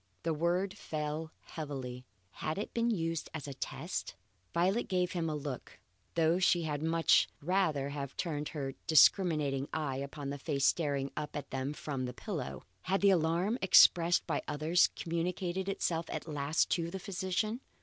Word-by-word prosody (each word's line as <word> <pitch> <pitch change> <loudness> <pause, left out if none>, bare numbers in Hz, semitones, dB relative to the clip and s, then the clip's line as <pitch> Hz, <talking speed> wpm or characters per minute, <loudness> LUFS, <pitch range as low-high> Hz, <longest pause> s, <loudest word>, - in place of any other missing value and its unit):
The 165 - +1
word 175 +5 0
fell 155 +1 -4
heavily. 130 -5 -6 0.2
Had 155 +2 -3
it 205 - -4
been 235 0 +1
used 165 -6 -1
as 150 -2 -5
a 140 - -5
test? 125 - -4 0.4
Violet 190 +7 +1
gave 180 -1 +1
him 165 -2 -1
a 155 - -2
look, 140 -4 -6 0.4
though 165 +1 +3
she 175 -2 +3
had 150 -2 -2
much 165 +1 +4
rather 155 -5 +1
have 140 -2 -5
turned 150 -3 -2
her 135 -3 -4
discriminating 150 -4 +4
eye 145 -4 -2
upon 140 +1 -5
the 140 - -5
face 140 0 0
staring 140 -4 +1
up 150 -1 -4
at 145 - -5
them 135 +1 -2
from 140 -4 -4
the 125 0 -6
pillow. 165 - -5 0.2
Had 195 +1 0
the 200 -1 +6
alarm 175 +7 +1
expressed 175 -2 +6
by 160 -4 -1
others 155 +4 +3
communicated 180 +3 -2
itself 165 -4 -1
at - - -5
last 150 +1 0
to 170 -1 +1
the 190 - -5
physician? 195 +4 -2
160 Hz, 165 wpm, -32 LUFS, 145-180 Hz, 0.4 s, the